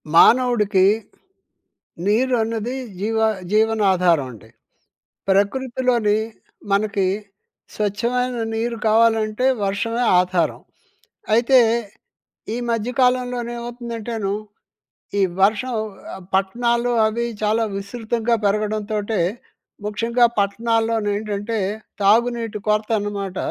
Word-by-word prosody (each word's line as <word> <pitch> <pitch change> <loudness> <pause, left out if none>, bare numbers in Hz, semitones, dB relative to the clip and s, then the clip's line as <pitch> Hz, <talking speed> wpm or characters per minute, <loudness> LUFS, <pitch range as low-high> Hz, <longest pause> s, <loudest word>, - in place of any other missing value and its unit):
మానవుడికి, 215 -4 +5 1.2
నీరు 250 +5 +2
అన్నది 225 +2 -3 0.3
జీవ 220 +2 -1 0.4
జీవన 220 +1 +3
ఆధారం 175 -6 +2
అండి. 110 0 -15 0.8
ప్రకృతిలోని 235 +1 +1 0.5
మనకి 200 -1 +1 0.7
స్వచ్ఛమైన 240 +4 -1 0.2
నీరు 230 +1 -2
కావాలంటే 225 +1 +3 0.2
వర్షమే 230 +5 -1 0.2
ఆధారం. 180 -3 0 0.7
అయితే, 245 +3 +5 1.0
ఈ - - -2
మధ్య 230 +1 -1
కాలంలోను 250 -1 +1
ఏమవుతుందంటేను, 235 -3 -4 0.9
ఈ - - +3 0.2
వర్షం 220 +5 +2 0.4
ఆహ్, 190 - -11
పట్టణాలు 235 +5 +1 0.2
అవి 235 +2 -2 0.2
చాలా 215 +2 +2
విస్తృతంగా 225 +3 -1
పెరగడంతోటే 215 +1 -1 0.7
ముఖ్యంగా 235 +3 +2
పట్టణాల్లో 225 +3 +1 0.2
ఏంటంటే 210 +1 -3 0.4
తాగునీటి 230 +1 +2
కొరత 215 0 +1
అన్నమాట 200 -2 -4
220 Hz, 85 wpm, -21 LUFS, 205-235 Hz, 1.2 s, మానవుడికి